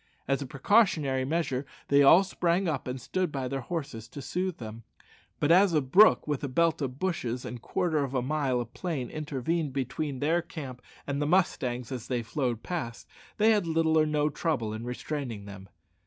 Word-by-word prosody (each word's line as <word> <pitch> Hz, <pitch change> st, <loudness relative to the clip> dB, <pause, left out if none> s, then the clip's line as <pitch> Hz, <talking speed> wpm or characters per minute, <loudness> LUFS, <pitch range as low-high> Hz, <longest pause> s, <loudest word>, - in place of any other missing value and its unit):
As 135 Hz, +1 st, +1 dB
a 140 Hz, -, -4 dB
precautionary 140 Hz, -, +2 dB
measure 140 Hz, -3 st, -1 dB, 0.3 s
they 140 Hz, 0 st, +6 dB
all 165 Hz, +7 st, +8 dB
sprang 180 Hz, -1 st, 0 dB
up 145 Hz, -6 st, -2 dB
and 125 Hz, +1 st, -3 dB
stood 180 Hz, +6 st, -2 dB
by 135 Hz, -3 st, -3 dB
their 135 Hz, +1 st, -3 dB
horses 140 Hz, -7 st, -5 dB
to 140 Hz, -, -9 dB
soothe 180 Hz, +6 st, -2 dB
them, 110 Hz, -1 st, -8 dB, 0.6 s
but 145 Hz, -, +2 dB
as 185 Hz, 0 st, +5 dB
a -, -, +5 dB
brook 180 Hz, +12 st, +5 dB
with 150 Hz, -2 st, -2 dB
a -, -, 0 dB
belt 165 Hz, +4 st, +1 dB
of 130 Hz, -2 st, -3 dB
bushes 130 Hz, -9 st, -2 dB
and 125 Hz, -2 st, -6 dB
quarter 160 Hz, +2 st, 0 dB
of 135 Hz, -1 st, -4 dB
a 130 Hz, -, +2 dB
mile 135 Hz, -2 st, 0 dB
of 120 Hz, 0 st, -6 dB
plain 155 Hz, -9 st, -3 dB
intervened 150 Hz, 0 st, -2 dB
between 135 Hz, +2 st, -2 dB
their 160 Hz, +6 st, +1 dB
camp 135 Hz, -7 st, -8 dB, 0.2 s
and 140 Hz, 0 st, -2 dB
the 145 Hz, -, +1 dB
mustangs 130 Hz, -9 st, +1 dB
as 125 Hz, -3 st, -5 dB
they 125 Hz, -2 st, -1 dB
flew 125 Hz, 0 st, -1 dB
past, 120 Hz, -2 st, -5 dB, 0.3 s
they 220 Hz, +1 st, +5 dB
had 205 Hz, -5 st, +2 dB
little 160 Hz, -1 st, +2 dB
or 155 Hz, -, +3 dB
no 150 Hz, -1 st, +1 dB
trouble 135 Hz, -8 st, -1 dB
in 110 Hz, +2 st, -6 dB
restraining 125 Hz, -4 st, -4 dB
them. 100 Hz, -1 st, -10 dB
140 Hz, 195 wpm, -28 LUFS, 125-165 Hz, 0.6 s, all